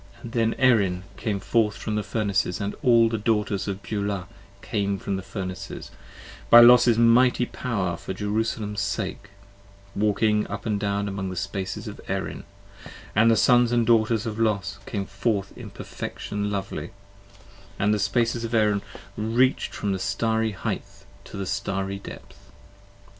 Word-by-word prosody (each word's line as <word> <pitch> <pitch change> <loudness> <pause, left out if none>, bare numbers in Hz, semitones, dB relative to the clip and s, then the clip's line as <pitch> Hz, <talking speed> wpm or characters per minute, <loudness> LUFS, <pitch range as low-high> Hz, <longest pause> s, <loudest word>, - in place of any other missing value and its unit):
Then 115 -1 0
Erin 100 -8 +3
came 105 -4 -2
forth 105 +1 +1
from 110 - -4
the 105 - 0
Furnaces, 100 -4 -1
& - - -14
all 115 -2 +5
the 110 -1 -2
Daughters 105 -2 0
of 100 0 -4
Beulah 100 -3 -3 0.4
Came 100 -2 -1
from 95 - -3
the 95 - -3
Furnaces, 95 -2 -6 0.6
by 120 - +10
Los's 120 -1 +7
mighty 120 +2 +4
power 100 -9 -2
for - - -7
Jerusalem's 105 +1 -2
10 - - -1
Sake: 105 - -9 0.7
walking 105 +1 +2
up 100 +1 -6
and 105 -2 0
down 100 0 -1
among 95 -1 -3
the 95 - -5
Spaces 95 +3 -4
of 105 - -8
Erin: 95 0 -4 0.7
And 115 +3 +5
the 115 - +5
Sons 120 -2 +4
and 120 -1 +2
Daughters 115 0 +3
of 110 -1 -4
Los 100 -3 0
came 100 -2 -3
forth 100 -2 -2
in - - -9
perfection 105 0 -5
lovely, 95 -5 -4 0.8
And 105 +1 +2
the 105 - 0
Spaces 115 +2 0
of 115 0 -2
Erin 105 -2 +3 0.3
reach'd 120 +5 +1
from 100 - -2
the 95 - -1
starry 110 +2 0
heighth 100 -1 -5 0.2
to - - -9
the 100 - -3
starry 95 +1 -2
depth. - - -12
105 Hz, 155 wpm, -25 LUFS, 100-115 Hz, 0.8 s, by